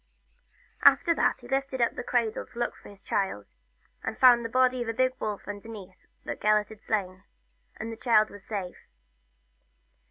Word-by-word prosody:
After 340 - +6
that - - +1
he 240 - -12
lifted 270 0 -1
up 235 - +2
the - - -5
cradle 235 -3 0
to - - -18
look 240 0 -1
for - - -14
his 200 -1 -15
child, 190 - -2 0.5
and 220 - -4
found 245 -2 +7
the 230 - -4
body 255 +1 +2
of 240 - -3
a - - -1
big 255 +1 +2
wolf 210 -3 -4
underneath 205 -2 -9 0.2
that - - -6
Gelert 210 0 +3
had 220 -1 -13
slain, 190 -3 -2 0.5
and 225 +1 -5
his 225 - -9
child 220 -3 +3
was 205 -1 -12
safe. 200 -7 -6
225 Hz, 180 wpm, -28 LUFS, 205-245 Hz, 0.5 s, found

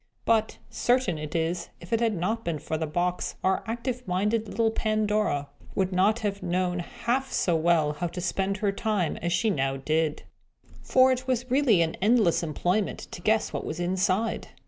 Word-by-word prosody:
But, 220 -1 +2
certain 245 -9 +1
it 150 +2 -6
is, 170 +1 -1
if 170 +5 -7
it 225 - +3
had 230 -3 +1
not 215 +6 -1
been 170 -2 -2
for 155 +2 -4
the 160 0 -2
box, 175 +3 -1
our 190 0 +1
active 240 +1 -3
minded 210 +5 0
little 225 0 +1
Pandora 215 -9 0 0.3
would 190 -1 +1
not 205 +6 +3
have 200 -1 -2
known 180 0 0
half 240 +7 -2
so 175 - +1
well 160 -2 +2
how 175 +4 -2
to 175 +2 -7
spend 195 +2 -1
her 205 -1 +1
time 200 -4 -1
as 170 - -2
she 220 +5 +2
now 135 -5 0
did. 155 +2 0 0.6
For 260 0 +4
it 255 0 -2
was 255 -1 -1
really 250 -10 +4
an 160 - -3
endless 210 -4 +4
employment 175 +5 -1
to - - -8
guess 220 +4 +1
what - - -3
was 160 - -5
inside. 185 +4 0
190 Hz, 185 wpm, -27 LUFS, 170-225 Hz, 0.6 s, For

